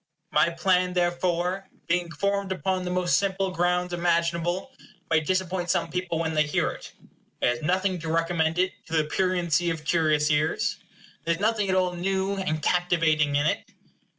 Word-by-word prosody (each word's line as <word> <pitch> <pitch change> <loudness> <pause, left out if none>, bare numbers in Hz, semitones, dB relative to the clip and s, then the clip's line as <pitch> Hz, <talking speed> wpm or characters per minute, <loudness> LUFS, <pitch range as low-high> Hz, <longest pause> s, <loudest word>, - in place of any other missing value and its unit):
My - - +4
plan, 180 +1 +1
therefore, 175 +1 0 0.2
being 175 0 0
formed 200 +3 -1
upon 190 0 -1
the - - -2
most 180 -1 +2
simple 195 -1 0
grounds 180 0 0
imaginable, 170 +4 0 0.4
may 160 - +5
disappoint 180 +2 -1
some 165 - 0
people 180 -2 -2
when 160 -1 -1
they 155 - +3
hear 150 -1 +1
it. - - -10 0.5
It - - +2
has 120 0 0
nothing 185 +3 0
to 160 0 -4
recommend 165 0 +1
it 185 +1 +2 0.2
to - - -8
the 155 - +3
pruriency 175 0 +1
of 165 -2 -4
curious 155 -2 +2
ears. 150 +1 +1 0.5
There 170 0 +1
is - - -12
nothing 210 -1 +1
at 185 - +2
all 185 -1 +2
new 190 +2 -1
and 155 -6 -2
captivating 165 -5 +2
in 145 +1 +2
it. 150 - 0
175 Hz, 175 wpm, -26 LUFS, 165-185 Hz, 0.5 s, may